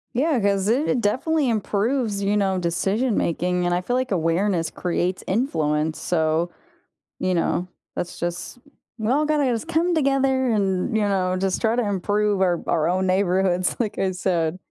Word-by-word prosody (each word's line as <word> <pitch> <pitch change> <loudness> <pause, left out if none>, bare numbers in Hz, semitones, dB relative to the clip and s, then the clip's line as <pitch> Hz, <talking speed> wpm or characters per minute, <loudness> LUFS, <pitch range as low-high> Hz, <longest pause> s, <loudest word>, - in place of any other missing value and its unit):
Yeah, 275 0 +2
'cause 200 -1 +1
it 250 +1 +1
definitely 265 +6 +1
improves, 215 0 0
you 205 +1 +1
know, 190 -2 +1
decision 195 +7 0
making. 180 +2 0
And 175 - +1
I 180 - +1
feel 245 +6 -2
like 255 -2 -1
awareness 170 0 +1
creates 180 +1 -2
influence. 160 - 0
So, 160 0 0 0.7
you 185 - 0
know, 175 +1 0 0.3
that's 175 - -5
just 175 +6 -4 0.4
"Well, 250 +7 +1
gotta 300 -2 +1
just 235 +7 -3
come 335 +1 +1
together 270 -3 +2
and, 195 +1 0
you 220 - +2
know, 185 -2 +1
just 190 0 -1
try 225 0 +2
to 245 - +1
improve 205 +1 0
our 175 -2 +2
our 160 +1 +1
own 185 +1 +1
neighborhoods." 185 -1 +1
like 215 -3 -2
I 190 - +1
said. 175 -2 -1
195 Hz, 165 wpm, -23 LUFS, 180-240 Hz, 0.7 s, Yeah